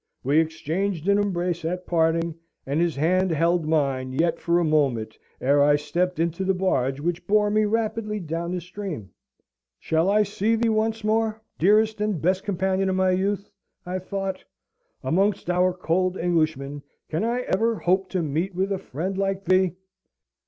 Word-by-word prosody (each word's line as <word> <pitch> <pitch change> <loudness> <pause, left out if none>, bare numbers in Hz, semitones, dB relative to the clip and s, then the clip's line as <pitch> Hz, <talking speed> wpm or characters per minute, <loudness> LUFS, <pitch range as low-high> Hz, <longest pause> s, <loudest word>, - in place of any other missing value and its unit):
We 145 +4 +3
exchanged 165 +3 -2
an 200 0 +4
embrace 175 -4 -1
at 180 +2 -3
parting, 165 0 +1 0.3
and 140 +4 0
his 170 -3 +1
hand 185 +6 +2
held 170 0 +1
mine 135 -5 0
yet 165 +5 +1
for 170 0 +1
a 175 - +2
moment 135 -9 +1 0.2
ere 140 +2 +3
I 145 +1 +5
stepped 170 +5 -1
into 170 +3 -1
the 190 0 +1
barge 135 -8 0
which 175 +3 -3
bore 210 0 +3
me 215 0 +3
rapidly 215 0 -1
down 170 0 -4
the 180 -1 -2
stream. 175 - -7 0.7
"Shall 160 +3 +1
I 210 +1 +4
see 210 +2 0
thee 230 0 +1
once 220 0 0
more, 220 0 +1 0.2
dearest 215 +4 +3
and 210 -5 0
best 185 +4 +1
companion 190 0 0
of 190 - 0
my 185 0 +3
youth?" 200 +2 -1 0.3
I 180 +1 -3
thought. 195 0 -4 0.6
"Amongst 195 +1 +1
our 180 +1 +3
cold 185 +1 0
Englishmen, 155 -5 0 0.3
can 160 +6 -2
I 240 +2 0
ever 225 +1 +1
hope 190 -1 +1
to 185 -3 -1
meet 165 +6 -2
with 190 +2 0
a 195 - -1
friend 185 +3 -4
like 195 0 -1
thee? 185 0 +3
180 Hz, 170 wpm, -24 LUFS, 160-200 Hz, 0.7 s, I